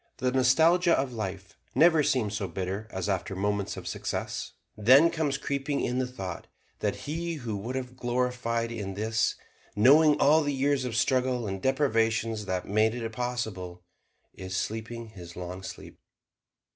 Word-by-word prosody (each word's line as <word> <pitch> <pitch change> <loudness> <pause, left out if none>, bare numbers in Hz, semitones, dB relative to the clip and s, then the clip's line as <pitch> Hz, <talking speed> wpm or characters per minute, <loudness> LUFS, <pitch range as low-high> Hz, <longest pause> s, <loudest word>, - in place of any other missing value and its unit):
The 130 0 0
nostalgia 160 +8 +4
of 135 -2 -1
life 95 -4 -5 0.2
never 160 +3 +6
seems 120 -7 +1
so 100 -2 -2
bitter 95 +4 -4
as 95 -3 -4
after 95 0 -2
moments 100 +1 -1
of - - -7
success; - - -4 0.2
then 130 +10 +6
comes 155 -4 0
creeping 140 +1 -2
in 125 +1 -1
the 130 - 0
thought 95 -8 -7 0.3
that - - 0
he 165 +3 -3
who 120 -7 -4
would 115 +6 -5
have 125 -1 -5
gloried 120 -2 -1
in 100 -4 -5
this 110 +2 0 0.4
knowing 145 +8 +6
all 155 +3 +5
the 145 -1 -1
years 135 0 +1
of 120 -3 -3
struggle 125 -1 +1
and 95 -2 -4
deprivations 115 -5 +1
that 95 -2 -2
made 110 +2 +2
it 115 -2 -3
possible 110 -7 -4 0.5
is 95 0 -5
sleeping 115 +3 -4
his 90 -5 -11
long 90 +1 -6
sleep. 95 0 -9
115 Hz, 160 wpm, -28 LUFS, 100-130 Hz, 0.5 s, never